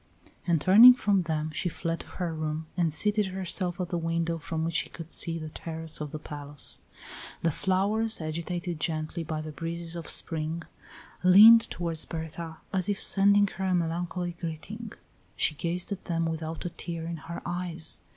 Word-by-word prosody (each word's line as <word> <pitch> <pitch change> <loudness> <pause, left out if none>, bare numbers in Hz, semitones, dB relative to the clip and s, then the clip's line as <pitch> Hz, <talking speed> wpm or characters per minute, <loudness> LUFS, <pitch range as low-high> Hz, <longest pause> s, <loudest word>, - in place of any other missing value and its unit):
And 170 -2 +3
turning 225 - +9
from 205 -6 +2
them 155 -2 -2
she 175 +3 -2
fled 165 +1 -3
to - - -10
her 175 -3 -2
room 155 0 -3
and 170 -3 +1
seated 210 +6 +1
herself 185 -1 -1
at 180 -2 -2
the 175 - -1
window 165 0 -1
from 160 +1 -3
which 165 - -2
she - - +1
could 165 -1 -10
see 165 -1 +2
the 155 -1 -7
terrace 160 -1 -5
of 150 - -4
the 155 - -5
palace. 145 -2 -3 0.6
The 165 - +3
flowers, 205 +7 +1
agitated 170 +2 -4
gently 155 +1 -2
by 155 0 -4
the 155 0 -6
breezes 165 +2 -5
of 170 -3 -6
spring, 160 +1 -1 0.6
leaned 215 +5 +8
toward 165 -2 -3
Berta 160 0 -6 0.2
as 185 0 +1
if 205 - 0
sending 200 +1 +5
her 190 -1 -4
a 185 -1 +2
melancholy 175 +1 -2
greeting. 195 +7 -6 0.4
She - - +2
gazed 170 +5 -3
at 195 - -5
them 165 -2 -1
without 160 0 -4
a 175 - -3
tear 165 -1 -6
in 170 0 -4
her 165 +3 -7
eyes. 175 -1 -1
170 Hz, 180 wpm, -28 LUFS, 160-185 Hz, 0.6 s, turning